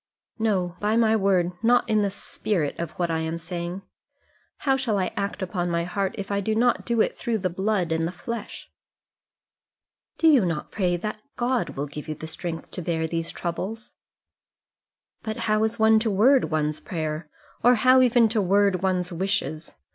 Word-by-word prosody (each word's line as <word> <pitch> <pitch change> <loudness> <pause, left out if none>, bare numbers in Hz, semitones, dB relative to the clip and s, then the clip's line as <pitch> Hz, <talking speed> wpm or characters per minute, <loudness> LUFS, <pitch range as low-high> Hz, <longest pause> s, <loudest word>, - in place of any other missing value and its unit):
"No, 185 -5 0
by 210 +1 +1
my 225 -1 +4
word; 190 -4 +2
not 240 +1 +4
in 215 -1 +2
the 200 - +1
spirit 195 -4 -2
of 170 - -2
what 175 -2 -1
I 160 - 0
am 160 +1 -2
saying. 170 +3 -5 0.8
How 270 -1 +4
shall 250 -6 0
I 185 -2 -1
act 200 0 -3
upon 175 -1 -2
my 170 0 0
heart, 190 +2 -2
if 200 0 -5
I 200 - +1
do 215 +2 -1
not 240 +2 +2
do 235 -2 +2
it - - +1
through 230 -2 -1
the 185 -3 -2
blood 190 -2 0
and 165 0 +1
the - - -4
flesh?" 230 +4 -7 1.5
"Do 325 - +3
you 280 -8 +6
not 165 -4 -2
pray 180 -4 0
that 215 +4 -5
God 245 - -1
will 140 - -1
give 150 +2 -8
you 155 -1 -4
strength 165 +1 -6
to - - -5
bear 160 -1 -1
these 165 0 -3
troubles?" 195 +6 -5 1.3
"But 220 -1 -4
how 215 0 +2
is 220 +1 0
one 220 0 +5
to 225 0 0
word 245 +7 +4
one's 155 -1 -1
prayer, 155 -2 -4 0.3
or 245 +1 +6
how 255 +3 +5
even 240 -2 +5
to 220 -1 +1
word 195 -1 +3
one's 180 -1 0
wishes? 170 -3 -2
195 Hz, 185 wpm, -25 LUFS, 170-220 Hz, 1.5 s, you